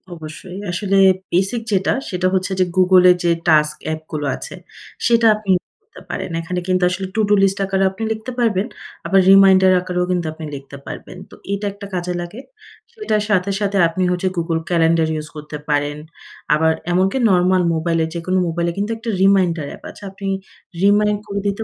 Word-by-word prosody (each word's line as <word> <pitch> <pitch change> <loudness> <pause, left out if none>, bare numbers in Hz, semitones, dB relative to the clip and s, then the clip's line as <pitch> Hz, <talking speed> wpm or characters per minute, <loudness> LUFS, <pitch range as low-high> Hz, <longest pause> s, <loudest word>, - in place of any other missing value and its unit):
অবশ্যই। 165 +4 -9
আসলে 195 +2 0 0.3
বেসিক 195 +6 0
যেটা, 190 -1 +2 0.2
সেটা 185 0 0
হচ্ছে 185 +1 0
যে 185 - +4
Google 185 0 +5 0.2
যে 170 - +3 0.2
টাস্ক 150 -1 +4
অ্যাপ 155 0 -2
গুলো 150 -2 -3
আছে, - - -8 0.5
সেটা 230 -1 +4
আপনি 210 -2 -9
ইউস 180 - -6
করতে 430 - -16
পারেন। - - -4
এখানে 180 +2 -3
কিন্তু 185 0 +1
আসলে 190 +1 -3
to-do 210 -2 +2
List 195 0 +2
আকারেও 195 0 +1
আপনি 195 +4 -7
লিখতে 220 +3 -4
পারবেন, 220 -2 +1 0.4
আবার 195 +3 +3
রিমাইন্ডার 190 -1 +6
আকারেও 180 0 -2
কিন্তু 175 -2 -1
আপনি 160 0 -8
লিখতে 140 0 -10
পারবেন। 185 - -8
তো - - -14 0.2
এটা 200 +1 -3
একটা 200 0 -10
কাজে 180 0 -2
লাগে। 175 +7 -8 0.5
সেটার 215 - -1
সাথে, 195 -1 +1
সাথে 200 -1 -1
আপনি 175 +3 -2
হচ্ছে 180 +1 -1
Google 165 -1 -1
Calendar 165 -1 +2
ইউস 155 0 -5
করতে 150 0 -7
পারেন, 145 0 0 0.6
আবার 160 +1 +3 0.2
এমনকি 190 +7 +1
নরমাল 180 0 +3
মোবাইলে, 165 0 0
যেকোনো 185 +2 -1
মোবাইলে 170 +1 -1
কিন্তু 205 +2 -2
একটা 225 +1 -6
রিমাইন্ডার 185 -5 +3
অ্যাপ - - -12
আছে। - - -13
আপনি 195 0 -7 0.6
রিমাইন্ড 205 +1 +3
করে 200 0 -3
দিতে 200 +2 -2
185 Hz, 180 wpm, -19 LUFS, 170-200 Hz, 0.6 s, রিমাইন্ডার